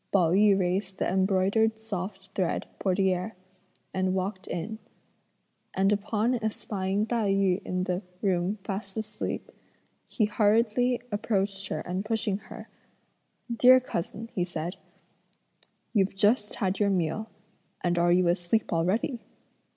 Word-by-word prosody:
Pao 175 -5 +4
yü 200 +1 +5
raised 190 +1 -1
the - - 0
embroidered 195 +4 +2
soft 195 -3 -5
thread 185 -3 -1
portiere 190 +1 +1 0.6
and 185 0 +1
walked 190 +1 -3
in; 180 +6 -4 1.0
and 195 +1 +3
upon 215 +4 +1
espying 205 -2 -1
Tai 225 -3 +1
yü 195 -1 +2
in 180 0 -2
the 180 0 -1 0.2
room 190 +1 +1
fast 195 0 -4
asleep, 215 -1 -4 0.6
he 215 - +1
hurriedly 225 +4 +2
approached 200 -2 -1
her - - -3
and 185 +2 -3
pushing 215 -2 -1
her: - - -11 0.9
"Dear 255 +2 +8
cousin," 230 -1 -5
he 180 - 0
said, 175 0 -4 1.2
"you've 195 -3 +2
just 210 +2 +2
had 190 -1 -1
your 205 -1 +3
meal, 185 +3 0 0.5
and 175 -1 +1
are 175 0 +4
you 180 0 +4
asleep 175 +5 +1
already?" 190 +9 +1
195 Hz, 130 wpm, -28 LUFS, 185-215 Hz, 1.2 s, Dear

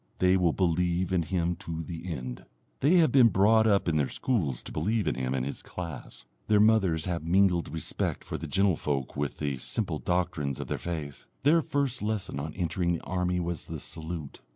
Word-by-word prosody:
They 90 0 +4
will 90 -3 +3
believe 90 +1 +1
in 90 - +3
him 85 +1 -1
to 80 -1 -5
the 85 +3 -6
end. 65 -5 -6 0.3
They 150 +7 +4
have 165 -7 +5
been 130 -3 +7
brought 110 +3 +4
up 100 -4 +3
in 80 -2 +2
their 70 -3 +1
schools 80 - -1
to - - -7
believe 110 0 0
in - - +2
him 65 +1 -2
and 65 -1 -1
his 70 - -5
class, 85 -8 -7 0.2
their 105 -1 +4
mothers 100 -7 +3
have 85 -2 -2
mingled 90 -1 +2
respect 80 -1 -2
for - - -5
the - - -5
gentlefolk 75 -9 0
with 70 -1 -2
the 70 -3 -2
simple 80 - -2
doctrines 85 -7 -1
of - - -6
their - - -2
faith, 80 -5 -5 0.2
their 160 +4 +5
first 140 -4 -1
lesson 105 -8 -2
on 75 +3 -5
entering 85 -1 0
the 85 - -4
army 90 0 -1
was 85 -3 -3
the - - -5
salute. 80 -3 -5
85 Hz, 200 wpm, -28 LUFS, 80-100 Hz, 0.3 s, been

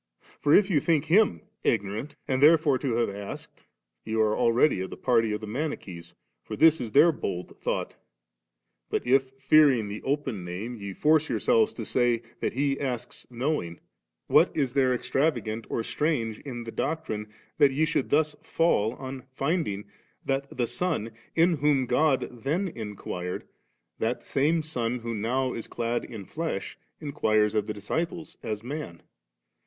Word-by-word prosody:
for 145 - +1
if 200 +4 +6
you 155 - +4
think 160 0 +1
Him 210 +6 +3 0.2
ignorant 110 +6 -1
and 130 0 0
therefore 150 -3 +5
to 130 -5 -1
have 115 -2 +1
asked, 100 0 -8 0.4
you 110 0 -2
are 110 -1 +3
abready 120 -3 +3
of 95 - -6
the - - -8
party 115 -3 +2
of 105 +1 -2
the - - -5
Manichees, 100 - -5 0.3
for - - -6
this 160 -2 +5
is 115 -3 -4
their 160 +4 +7
bold 90 - -5
thought; - - -2 0.9
but - - -1
if^ 135 +1 +1
fearing 135 -6 +5
the 105 +1 -6
open 135 -8 -2
name, 95 +8 -5
ye 100 -3 -6
force 155 +8 +3
yourselves 225 -3 +3
to - - -6
say, 120 -2 +1 0.2
that - - -1
He 140 +1 0
asks 130 -4 -4
knowing, 125 - -2 0.5
what - - +5
is 135 -4 +1
there 130 -2 +3
extravagant 125 -4 -1
or 115 - -1
strange 115 -7 -1
in 120 -4 -6
the 115 - -7
doctrine, 110 -11 -3 0.3
that 145 -2 +7
ye 150 +4 +2
should 150 -3 -1
thus 150 0 +2
fall, 120 -10 +1
on 130 0 -7
finding 140 - -1 0.4
that 135 0 -1
the 120 - +2
Son, 120 - -2 0.2
in 165 0 +4
whom 140 -2 +2
God 135 +3 +2
then 170 - 0
inquired, 100 - -5 0.5
that - - -1
same 155 +4 +1
Son 125 -6 -2
who 115 -1 -5
now 125 +4 0
is 115 - -6
clad 120 0 -2
in 105 -4 -8
flesh, 155 - -4 0.2
inquires 110 -8 +1
of 105 -1 0
the 105 - -2
disciples 160 - -4
as 110 -2 -4
man 130 - -6
130 Hz, 160 wpm, -27 LUFS, 110-150 Hz, 0.9 s, their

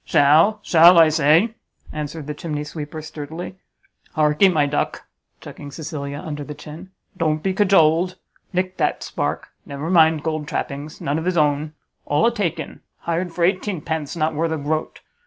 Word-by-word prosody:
"Shall, 155 +9 +4
shall! 170 0 +7
I 165 -1 +7
say!" 160 +8 +3 0.4
answered 150 0 -5
the 150 - -4
chimneysweeper, 150 0 -6
sturdily; 160 +4 -7 0.6
"Hark'ee, 155 +5 +4
my 155 -4 +2
duck," 145 +1 -2 0.4
chucking 145 - -10
Cecilia 145 -2 -6
under 150 -2 -6
the 150 +1 -8
chin, 155 +5 -11 0.3
"don't 155 -2 -1
be 190 - 0
cajoled, 185 -3 +3 0.4
nick 185 +1 -2
that - - 0
spark! - - -3
never 140 +4 -5
mind 160 -3 +4
gold 155 -2 -3
trappings; 150 -2 -5
none 145 +3 -1
of 160 - -6
his 180 -1 0
own; 150 0 +1 0.3
all 145 +2 +2
a 235 - +3
take 185 -7 -1
in; - - -7 0.2
hired 170 +1 -2
for 170 +1 -2
eighteenpence; 170 -5 -1
not 160 -1 0
worth 160 +2 -1
a - - -1
groat. 155 +2 -3
155 Hz, 160 wpm, -21 LUFS, 150-170 Hz, 0.6 s, shall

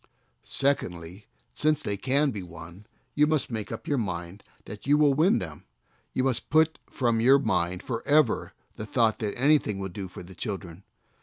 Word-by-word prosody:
Secondly, 95 -9 -2 0.3
since 155 0 +1
they 100 - -2
can 140 +7 +1
be 105 -4 -5
won, 85 +3 -11 0.3
you 150 +1 +4
must 155 -5 0
make 110 -3 -4
up - - -7
your 145 -3 +1
mind 90 -2 -4 0.2
that 105 +4 -9
you 145 +1 +5
will 150 -2 +5
win 160 +8 +4
them; 80 -5 -6 0.5
you 130 - 0
must 130 -2 -1
put 160 +1 +3
from 120 -3 0
your 130 +4 +7
mind 90 -9 -1
forever 140 +2 +1 0.3
the 110 - -6
thought 115 -5 +2
that 105 -2 -3
"anything 135 -6 +3
will 95 0 -4
do 95 +1 -6
for 90 - -10
the 90 +2 -12
children." 95 -3 -6
115 Hz, 175 wpm, -27 LUFS, 95-140 Hz, 0.5 s, your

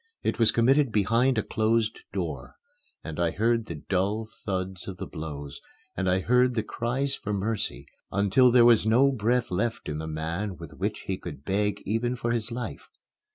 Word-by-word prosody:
It - - -1
was 115 - +5
committed 135 +3 +3
behind 115 +5 +2
a 110 - +2
closed 110 0 +1
door; - - -4 0.5
and 80 0 -6
I 85 -1 +2
heard 115 +4 +1
the 85 - -5
dull 100 +4 0 0.2
thuds 95 -2 -3
of 95 -2 -6
the - - -5
blows, 75 -2 -7 0.3
and 95 - 0
I 90 +1 +2
heard 125 +3 +3
the 110 - 0
cries 130 +5 -2
for 105 -6 -4
mercy 105 +2 -2 0.3
until 100 +6 +4
there 120 -1 +6
was 120 -2 +6
no 125 +6 +4
breath 120 -1 0
left 105 +6 -1
in 75 0 -3
the 80 - -5
man 85 +5 -3
with 85 -4 -9
which - - -3
he - - -3
could 70 - -9
beg 105 +1 0
even 115 +4 0
for 120 -2 -2
his 115 -1 -2
life. 120 +1 -5
110 Hz, 185 wpm, -27 LUFS, 95-120 Hz, 0.5 s, there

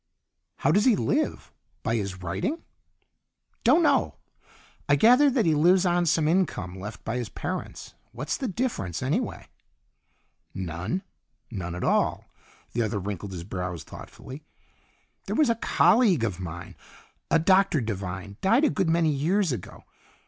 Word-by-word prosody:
"How - - +1
does 205 - +3
he 250 -4 +5
live? 115 - -1 0.3
By 115 - 0
his 95 -3 -5
writing?" 95 - -3 1.0
"Don't 300 +9 +5
know. - - +2 0.7
I 145 - +6
gathered 250 - +5
that 235 - +3
he 160 - +3
lives 175 +5 +4
on 175 -1 +2
some 160 -1 +2
income 140 - 0
left 105 +3 -8
by 115 +2 -3
his 120 -4 -4
parents. - - -6 0.2
What's 130 +5 -3
the 265 - -3
difference, 170 - -3
anyway?" 180 - -2 1.1
"None. 95 - -3 0.5
None 90 -5 -5
at 90 - -5
all." - - +1 0.5
The 120 - 0
other 110 -2 -1
wrinkled 100 0 -5
his 90 -3 -6
brows 90 -3 -5
thoughtfully. 135 +3 -11 0.9
"There - - -2
was 300 -6 +4
a - - +1
colleague 205 - +4
of 100 -5 -2
mine, 85 -1 -7 0.5
a - - +4
Dr. 185 0 +3
Devine; 100 -3 -5
died 230 +9 +3
a 305 - +4
good 190 -5 0
many 165 -1 +3
years 170 +6 +1
ago. 125 - -7
140 Hz, 150 wpm, -26 LUFS, -, 1.1 s, I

